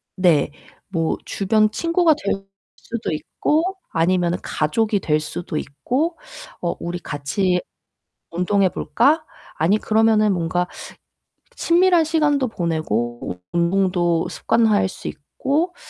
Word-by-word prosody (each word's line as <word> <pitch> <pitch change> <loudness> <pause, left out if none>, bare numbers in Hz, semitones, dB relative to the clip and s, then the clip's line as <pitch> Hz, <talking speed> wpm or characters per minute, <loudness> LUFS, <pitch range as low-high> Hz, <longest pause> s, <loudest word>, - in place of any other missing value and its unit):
네. 175 -7 +3 0.4
뭐 165 -4 0
주변 215 +2 +2
친구가 335 +3 +3
될 195 -1 -1 0.3
수도 230 -6 -5
있고 300 - 0 0.3
아니면은 175 +1 +1
가족이 205 +7 0
될 155 -4 +1
수도 155 +1 -5
있고 250 - -2 0.4
"어 170 - -1
우리 175 +1 -4
같이 180 +5 -1 0.7
운동해 185 +3 +2
볼까?" 310 - +2 0.3
아니 175 +7 +3
'그러면은 215 -2 +3
뭔가 175 +1 0 0.9
친밀한 345 -1 +4
시간도 295 -4 +2
보내고 120 - -2
운동도 175 -1 +2
습관화할 215 -4 +2
수 - - -8
있고 290 - -2
190 Hz, 230 characters per minute, -21 LUFS, 170-235 Hz, 0.9 s, 친밀한